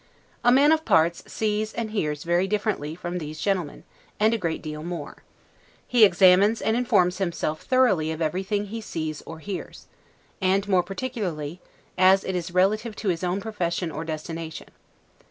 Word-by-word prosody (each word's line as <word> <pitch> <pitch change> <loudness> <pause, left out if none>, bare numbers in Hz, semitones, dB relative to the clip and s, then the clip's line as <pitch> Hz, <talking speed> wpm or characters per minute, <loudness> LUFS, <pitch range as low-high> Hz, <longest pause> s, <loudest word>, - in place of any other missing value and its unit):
A 245 - +5
man 280 +4 +6
of 320 0 +3
parts 170 - +3
sees 215 0 -1
and 225 -2 -4
hears 150 -8 -2
very 175 +2 +1
differently 200 -7 -2
from 175 +1 -4
these 155 -1 -7
gentlemen, 185 -7 -2 0.4
and 215 +2 +4
a - - +1
great 165 -4 -3
deal 150 -1 -6
more. 165 -3 -6 0.7
He 240 -3 +4
examines 195 +3 +5
and 220 - 0
informs 185 -7 +2
himself 170 -4 -2
thoroughly 210 -12 +2
of 160 - -5
everything 190 +6 -1
he 225 +3 -6
sees 155 -7 -4
or 165 - -7
hears; 190 +3 -7 0.6
and, 190 +2 +2
more 185 -3 +4
particularly, 180 - -4 0.4
as 190 +1 +6
it 190 - -3
is 175 -1 -3
relative 210 +5 +1
to 205 - -2
his 170 -1 -1
own 180 +2 0
profession 180 -6 -2
or 160 - -5
destination. 160 0 -6
185 Hz, 165 wpm, -25 LUFS, 165-210 Hz, 0.7 s, man